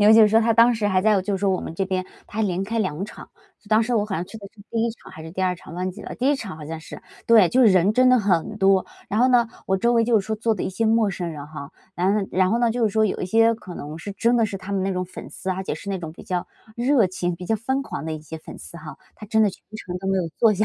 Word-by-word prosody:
因 205 - +5
为 220 - +8
就 225 - +8
是 210 - +6
说， 220 +2 +4
他 230 0 +3
当 230 +2 +6
时 220 -2 -1
还 190 -2 +2
在 210 -1 +4
就 195 +2 -2
是 - - -6
说 200 -1 +2
我 185 - 0
们 - - -7
这 195 +3 -1
边 185 -1 -2 0.2
他 220 - -4
连 185 -2 0
开 225 +4 -2
2 185 -4 -1
场。 210 - -11 0.4
当 215 +1 +4
时 245 +2 -2
我 210 -3 +1
好 195 - -3
像 170 - -2
去 220 - -11
的 200 - -10
是 215 - -17
第 230 -1 0
1 - - 0
场 220 - -15
还 185 - -11
是 160 0 -9
第 190 - -3
2 180 -1 +1
场， 165 - -12
忘 185 +1 -2
记 185 - -11
了。 - - -7
第 255 +3 0
1 290 - +2
场 200 -10 -7
好 155 - -9
像 160 +2 -6
是。 160 - -11 0.2
对， 220 -6 +6
就 255 - +2
是 250 - +7
人 190 0 +4
真 255 +3 +4
的 255 - +6
很 200 +1 0
多。 195 -2 +3 0.2
然 215 - 0
后 250 - +5
呢， 245 -3 +4 0.2
我 190 - +2
周 235 +5 +2
围 230 -1 +3
就 230 -1 +3
是 - - -10
说 220 - -1
坐 225 +1 0
的 200 - -4
一 - - -2
些 220 +4 -1
陌 220 -2 +3
生 175 -2 -4
人 145 -2 -7
哈， 150 -1 -9 0.2
然 185 +3 +2
后 205 -2 -1
然 185 0 +2
后 230 - +2
呢， 235 -1 +3
就 235 0 0
是 - - +1
说 220 +1 +3
有 210 - -1
一 - - -2
些 225 +4 +4
可 185 -5 -10
能 150 +1 -7
是 200 +5 -6
真 235 +5 +2
的 230 -2 +3
是 205 - -5
他 195 +1 -9
们 195 -1 0
那 195 - 0
种 180 0 -2
粉 180 - -10
丝， 190 - -5
而 190 +1 -3
且 - - -2
是 200 - -7
那 195 - -2
种 165 -3 -7
比 - - -13
较 180 -1 -3 0.3
热 240 -4 +3
情、 180 -1 -2
比 175 +2 -9
较 220 - +1
疯 265 +5 -1
狂 275 - -6
的 160 - -3
一 155 - -5
些 160 +1 -8
粉 - - -11
丝 - - -11
哈。 155 -2 -9 0.2
他 210 - -10
真 220 +1 +3
的 210 - +3
全 - - -15 0.2
程 180 -4 -6
都 190 - -7
没 195 0 +1
有 175 -3 -1
坐 225 -3 +5
下， 210 +3 +1
200 Hz, 350 characters per minute, -23 LUFS, 185-225 Hz, 0.4 s, 为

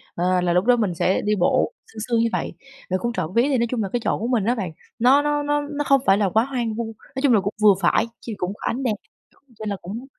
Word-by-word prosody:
ờ, 180 +1 +1
là 175 -1 +1
lúc 180 +3 +2
đó 245 0 +5
mình 210 -7 -1
sẽ 185 +3 +1
đi 210 +1 +1
bộ, 175 - +2 0.2
sương 220 - -9
sương 235 -1 +2
như 230 0 +2
vậy. - - -3 0.4
Rồi 185 0 0
cũng 235 +3 -2
trộm 165 -7 -3
vía 235 - +4
thì 275 -1 +1
nói 235 0 +1
chung 235 -3 -1
là 195 - -3
cái 245 - +1
chỗ - - 0
của 230 - -2
mình 240 -5 +1
á 240 +3 +2
bạn, 190 -8 -4 0.3
nó 260 +5 +5
nó 295 0 0
nó 290 0 +1
nó 290 0 -3
không 275 -1 +4
phải 195 - +5
là 200 -2 +1
quá 220 +5 +3
hoang 245 -4 -2
vu, 235 +1 -2 0.3
nói 265 - -2
chung 275 -4 +5
là 215 - +5
cũng 205 +2 -3
vừa 210 -1 +7
phải 175 +5 +3 0.2
ch - - -9
cũng 180 +1 -3
có - - -18
ánh 260 +4 -2
đèn, 230 -5 0 0.6
nên 215 -1 -4
là 200 - -1
cũng 215 +8 -7
225 Hz, 295 wpm, -22 LUFS, 195-255 Hz, 0.6 s, vừa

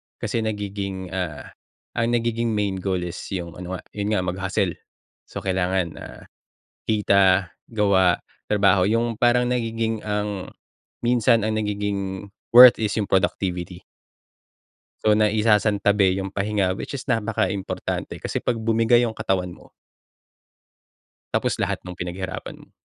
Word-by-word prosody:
Kasi 115 - -2
nagiging, 100 -4 -4
ah, 90 -6 -4 0.5
ang 120 0 +1
nagiging 115 -1 0
main 100 -2 -1
goal 95 -1 -1
is 90 0 -5 0.2
yung 85 -2 -5
ano 90 +1 -5
nga, - - -7
yun 105 +1 -1
nga, 90 - +1
mag-hustle. 95 0 -1 0.6
So - - -7
kailangan, 95 -4 -1
ah, - - -10 0.6
kita, 100 -3 +3 0.2
gawa, 95 -4 +3 0.2
trabaho, 100 -3 +3
yung 115 +1 0
parang 120 +1 +3
nagiging 115 -2 -2
ang 105 -2 -3 0.5
minsan 120 -1 +3
ang 110 +1 -1
nagiging 100 -2 -3 0.2
worth 125 0 +10
is 105 -2 -1
yung 100 - -4
productivity. 90 -2 -1 1.2
So, 105 - +5
naisasantabi 105 -2 +3
yung 95 0 -4
pahinga. 100 -2 0
Which 125 +8 -5
is 125 - -8
napaka-importante, 105 -5 -2
kasi - - -4
'pag 120 - -1
bumigay 115 +2 +3
yung 115 - -2
katawan 90 -4 -2
mo. - - -16 1.7
Tapos, - - 0
lahat - - -2
nung 90 -1 -9
pinaghirapan 95 +1 -6
mo. - - -19
100 Hz, 130 wpm, -23 LUFS, 95-110 Hz, 1.7 s, worth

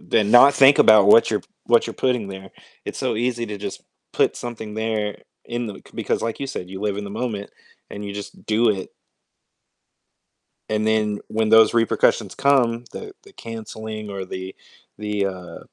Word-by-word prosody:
then 105 -2 +1
not 125 +4 +8
think 135 +1 +6
about 105 -2 +7
what 115 - +6
you're 105 - 0
p - - -27 0.2
what 120 -1 +4
you're - - -6
putting 120 -6 0
there, 95 0 -9 0.3
it's - - -6
so - - -1
easy 120 0 -1
to 105 -1 -6
just 100 -1 -7 0.3
put - - +1
something 110 -3 -7
there 110 -2 -2 0.3
in 120 0 -3
the 105 - -6
c - - -16
because - - -2
like 115 -1 -3
you 135 - -3
said, 90 -9 -6
you 95 +1 -8
live 105 -1 -1
in 105 - -5
the 100 - -7
moment, 105 -5 -4 0.4
and 105 - -7
you 100 - -5
just 100 0 -9
do 110 +2 +2
it. 95 -3 -4 1.8
And 110 0 -1
then, 105 -1 +1
when 110 0 -1
those 110 0 +6
repercussions 115 -2 +1
come 125 -4 +2
the 420 -2 -8
the 405 - -18
canceling 110 - -8
or 95 -1 -5
the 95 +1 -7 0.4
the, 105 -1 -1
uh 90 -2 -7
110 Hz, 185 wpm, -22 LUFS, 100-115 Hz, 1.8 s, not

